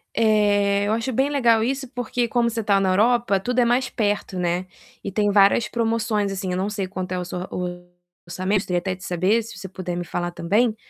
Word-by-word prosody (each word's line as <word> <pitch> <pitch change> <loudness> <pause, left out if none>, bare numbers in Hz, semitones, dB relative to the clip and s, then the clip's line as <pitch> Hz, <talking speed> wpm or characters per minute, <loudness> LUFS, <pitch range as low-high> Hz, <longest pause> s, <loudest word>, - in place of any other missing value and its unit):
Eh, 205 -2 +3
eu 215 - +1
acho 230 +3 -1
bem 270 +4 +1
legal 235 -6 +3
isso, 265 +2 -2
porque 245 -1 -2
como 235 0 +1
você 225 -1 -3
tá 200 -2 +3
na 190 -1 +1
Europa, 220 0 +3
tudo 250 +5 -1
é 240 - +4
mais 245 +2 +1
perto, 205 -3 -1
né, 180 +1 -1 0.4
e 200 - -4
tem 205 +1 +1
várias 200 +2 +4
promoções, 225 -3 0
assim. 190 -1 -3
Eu 180 - -1
não 195 +2 -1
sei 200 -3 -3
quanto 185 -1 -5
é 180 - -1
o - - -3
s 175 - -7
seu 180 - -4 0.9
orçamento 185 +3 0
gostaria 180 -3 -1
até 185 +1 -3
de 185 - -15
saber, 185 +6 +1
se 225 -3 -10
você 190 +1 -7
puder 185 -1 -5
me 175 - -3
falar 175 0 -3
também, 215 +7 +1
205 Hz, 225 wpm, -23 LUFS, 185-230 Hz, 0.9 s, é